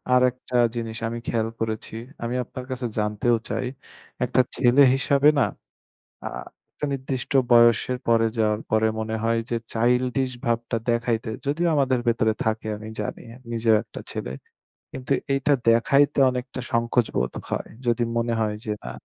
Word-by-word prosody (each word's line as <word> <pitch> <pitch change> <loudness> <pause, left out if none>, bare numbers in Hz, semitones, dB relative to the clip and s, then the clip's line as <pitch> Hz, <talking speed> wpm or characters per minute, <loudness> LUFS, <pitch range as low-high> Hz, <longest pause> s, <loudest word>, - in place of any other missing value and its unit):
আরেকটা 125 0 +1 0.2
জিনিস 115 -1 -4
আমি 120 +1 -4
খেয়াল 110 -1 0
করেছি। 110 -1 -3 0.3
আমি 120 +1 -2
আপনার 125 +1 -8
কাছে 130 -1 -3
জানতেও 105 +3 +1
চাই 130 - -2 0.6
একটা 130 +1 +3
ছেলে 130 +2 +4
হিসাবে 140 +2 +4
না - - +5 0.8
আ - - -1 0.5
একটা - - -4
নির্দিষ্ট 130 0 -4 0.2
বয়সের 120 +1 +5
পরে 115 -1 +4
যাওয়ার 105 -1 +1
পরে 110 0 +3
মনে 110 0 -2
হয় 115 0 +2
যে, 120 - 0 0.2
চাইল্ডিশ 125 +3 +1
ভাবটা 115 0 0
দেখাইতে 115 -1 0 0.2
যদিও 160 +5 +1
আমাদের 135 -3 +2
ভেতরে 110 -1 +2
থাকে 110 0 -1
আমি 110 +1 -8
জানি - - -4 0.3
নিজেও 115 -1 +3
একটা - - -10
ছেলে। 60 - -4 0.6
কিন্তু 130 +1 -3 0.2
এইটা 135 +1 +2 0.2
দেখাইতে 140 +6 +4
অনেকটা 125 +1 -5
সংকোচ 115 0 +2
বোধ 60 - 0 0.2
হয়। - - -2 0.2
যদি 120 0 +2
মনে 115 0 0
হয় 105 -1 0
যে 110 - -2
না - - -5
120 Hz, 150 wpm, -24 LUFS, 115-130 Hz, 0.8 s, না